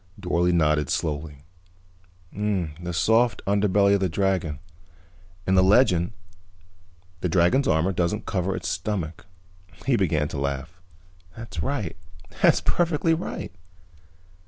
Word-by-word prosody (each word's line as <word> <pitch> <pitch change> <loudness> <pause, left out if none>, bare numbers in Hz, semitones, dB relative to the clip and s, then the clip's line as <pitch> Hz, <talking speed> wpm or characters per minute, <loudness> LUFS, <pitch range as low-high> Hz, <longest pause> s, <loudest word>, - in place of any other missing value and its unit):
Dorle 90 -2 +1
nodded 75 -4 +2
slowly. 75 -2 -3 0.9
"The 90 -5 -2
soft 110 +7 +2
underbelly 100 0 +3
of 100 - +3
the 95 -1 0
dragon. 90 -4 0 0.9
In 95 - +1
the 95 - +5
legend, 95 -2 +3 1.1
the 90 - -1
dragon's 90 +11 +3
armor 80 +4 +2
doesn't 90 +4 -1
cover 95 -1 -1
its - - -5
stomach." 90 -5 -3 0.6
He 135 - +3
began 80 -6 +1
to 70 - -5
laugh. 70 +5 -4 0.6
"That's 105 -8 -6
right. 110 - -2 0.5
That's - - +5
perfectly 165 -1 +1
right." 160 - -4
90 Hz, 115 wpm, -25 LUFS, 80-105 Hz, 1.1 s, the